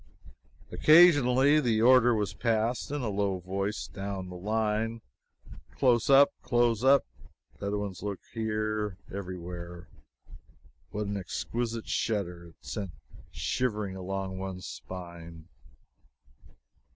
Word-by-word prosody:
Occasionally 145 -4 +6
the 120 -6 +1
order 125 -1 +6
was 105 -2 -1
passed 115 +1 0
in 145 -2 -3
a 115 - -1
low 100 -1 0
voice 95 +3 -3
down 95 -2 -5
the 90 - -8
line: 110 +3 -1 0.8
"Close 125 0 +3
up 140 +1 +7
close 120 -1 +1
up! 135 +1 +5 0.5
Bedouins 100 -2 -3
lurk 100 -1 -4
here, 110 -3 -2 0.2
every 95 -2 -5
where!" 85 0 -8 1.0
What 105 0 -3
an 100 0 -3
exquisite 115 +4 -4
shudder 90 -6 -2
it 85 - -18
sent 100 -5 -5 0.4
shivering 105 -6 -2
along 95 0 -4
one's 95 -1 -6
spine! 85 -3 -9
105 Hz, 110 wpm, -29 LUFS, 95-120 Hz, 1.0 s, up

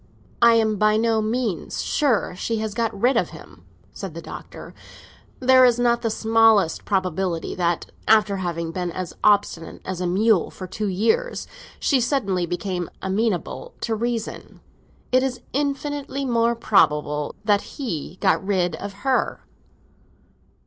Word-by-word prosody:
"I 235 0 +7
am 220 -2 +2
by 215 +1 +3
no 225 0 +2
means 220 -3 -2
sure 265 - +1
she 225 +5 -2
has 215 -1 -3
got 225 -3 -2
rid 250 +5 +3
of - - +1
him," - - -14 0.4
the - - -4
Doctor - - -10
said. 255 - -15
"There 260 0 +7
is 245 -2 +5
not 240 -1 +2
the 230 - 0
smallest 220 -5 +3
probability 185 -3 -1
that, 175 -1 0 0.2
after 210 -2 +4
having 170 -3 -3
been 180 0 -3
as 185 0 -5
obstinate 200 -5 +2
as 185 -1 -4
a 180 - 0
mule 200 +1 +3
for 185 - -8
two 205 +3 -4
years, 335 - 0 0.3
she 270 -4 +2
suddenly 200 -9 0
became 175 0 -3
amenable 215 - -2
to 230 - -1
reason. 230 0 -4 0.5
It 255 0 +4
is 255 -2 -2
infinitely 280 0 -2
more 235 -1 +2
probable 150 -9 +1
that 205 -1 +3 0.2
he 185 - -4
got 195 -1 +2
rid 185 -3 0
of 200 0 -6
her." 265 -1 0
215 Hz, 145 wpm, -23 LUFS, 185-235 Hz, 0.5 s, I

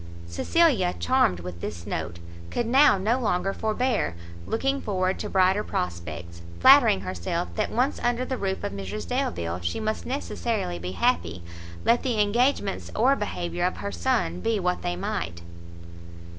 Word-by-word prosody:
Cecilia, 190 - +2
charmed 255 - +2
with 85 -1 -8
this 85 0 -5
note, 85 +1 -4 0.3
could 240 - -1
now 265 0 +5
no 220 +7 +1
longer 195 -4 0
forbear 220 - 0 0.3
looking 270 +4 0
forward 185 -2 -1
to - - -4
brighter 190 +2 +3
prospects, 85 -1 -5 0.2
flattering 95 +2 +7
herself 90 -1 -3
that - - -1
once 255 +5 +1
under 240 +1 0
the 260 - -2
roof 190 -5 -2
of - - -2
Mrs 100 0 -5
Delvile, 85 0 -2
she 85 0 -2
must 215 0 -2
necessarily 230 - -2
be 90 +1 -5
happy, 85 0 0 0.4
let 240 - +4
the 240 -5 -1
engagements 210 0 +1
or 255 +5 +4
behaviour 175 -6 -3
of 180 - 0
her 100 - -4
son 85 -1 0
be 220 - 0
what 180 -1 0
they 175 0 -2
might. 175 - -4
185 Hz, 155 wpm, -26 LUFS, -, 0.4 s, flattering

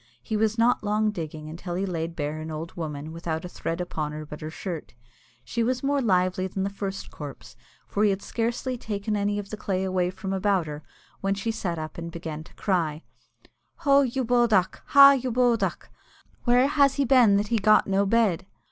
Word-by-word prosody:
He 220 - -3
was 220 +1 +1
not 235 0 +3
long 210 +1 +1
digging 155 -4 -6
until 175 +3 -6
he 190 +2 -1
laid 165 -2 -3
bare 150 0 -3
an 160 - -6
old 160 +2 -6
woman 155 -2 -5
without 165 0 -4
a - - -4
thread 165 -1 -4
upon 155 -4 -3
her 155 0 -6
but 150 0 -9
her 155 - -5
shirt. 165 -4 -6 0.5
She 235 - -2
was 250 +3 0
more 280 0 +1
lively 185 -4 +1
than 190 +1 -3
the 200 - -2
first 195 -1 -5
corpse, 135 -3 -9 0.3
for 205 - -1
he 210 - +5
had 195 0 -1
scarcely 240 +2 -2
taken 210 0 -3
any 205 0 0
of 200 -1 -6
the 215 - -4
clay 190 -3 -1
away 185 -1 0
from 190 +1 -5
about 195 -2 +1
her, 150 0 -6 0.4
when 195 0 0
she 215 +3 -2
sat 185 -6 -3
up 155 +1 -6
and 170 0 -6
began 160 -2 -6
to - - -18
cry, 165 -5 -1 0.8
"Ho, 280 0 +6
you 260 -1 -1
bodach 230 -6 +3
(clown)! - - -16
Ha, 280 -1 +9
you 255 0 -2
bodach! 240 -1 +1 0.5
Where 245 +1 +5
has 280 -2 +3
he 280 - +1
been 235 -6 +5
that 205 +1 -1
he 230 - +2
got 215 +2 +5
no 195 0 +1
bed?" 200 -5 +2
195 Hz, 210 wpm, -26 LUFS, 165-225 Hz, 0.8 s, Ha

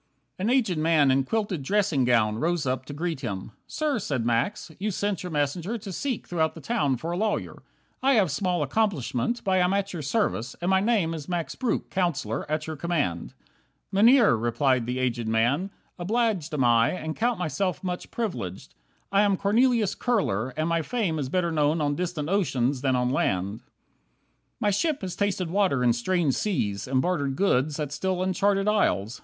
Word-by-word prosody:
9 195 - -1
An - - +2
aged 200 -11 +1
man 155 -3 +4
in 135 +1 +3
quilted 200 0 -2
dressing 175 -4 +1
gown 110 -3 +2
Rose 170 0 0
up 130 0 -1
to 145 - -8
greet 165 0 -3
him. 100 -6 -5 0.2
"Sir," 300 -5 -1
said 135 - -2
Max, 120 - -1
"you 210 +3 -1
sent 200 -1 -2
Your 180 - -6
messenger 160 +9 -1
to 200 -3 -8
seek 255 +6 -3
throughout 160 -2 -1
the - - -8
town 145 - 0
A - - -3
lawyer. 215 +3 -2 0.4
I 270 +1 +4
have 200 - +3
small 175 +2 0
accomplishment, 180 - -1
But 190 - 0
I 185 - +4
am 180 +1 +2
at 200 0 -1
your 170 - -4
service, 140 - -1
and 175 +2 0
my 190 - +5
name 200 -6 +1
Is 155 -1 -7
Max 170 -5 -2
Breuck, 255 -3 -2
Counsellor, 170 -5 -1
at 155 0 -1
your 160 - -5
command." 145 - -2 0.6
"Mynheer," 230 - +6
replied 120 +2 +1
the 125 +1 -2
aged 120 -3 -1
man, 120 - +1 0.3
"obliged 205 -4 0
Am 135 - +1
I, 115 -1 +4
and 160 -3 -4
count 240 +1 0
myself 180 +2 -2
much 180 -1 -4
privileged. 180 - -4 0.4
I 200 +1 +4
am 200 -2 +3
Cornelius 220 +1 +2
Kurler, 130 - 0
and 155 +1 0
my 170 -1 +1
fame 190 -6 -1
Is 135 -3 -3
better 175 +1 0
known 155 +1 +2
on 145 -1 +1
distant 170 -2 -3
oceans 140 -9 0
than 130 -2 +1
on 125 0 +1
land. 100 -3 0
10 - - -32 1.0
My 205 - +2
ship 300 - 0
has 185 -3 -4
tasted 190 -4 -1
water 185 -10 +2
in 120 -1 +4
strange 155 +4 +1
seas, 105 - -1
And 130 0 +1
bartered 145 -7 0
goods 150 -4 +1
at 150 -2 -3
still 185 +5 -1
uncharted 195 +1 +1
isles. 125 - +1
170 Hz, 190 wpm, -26 LUFS, 135-200 Hz, 1.0 s, Mynheer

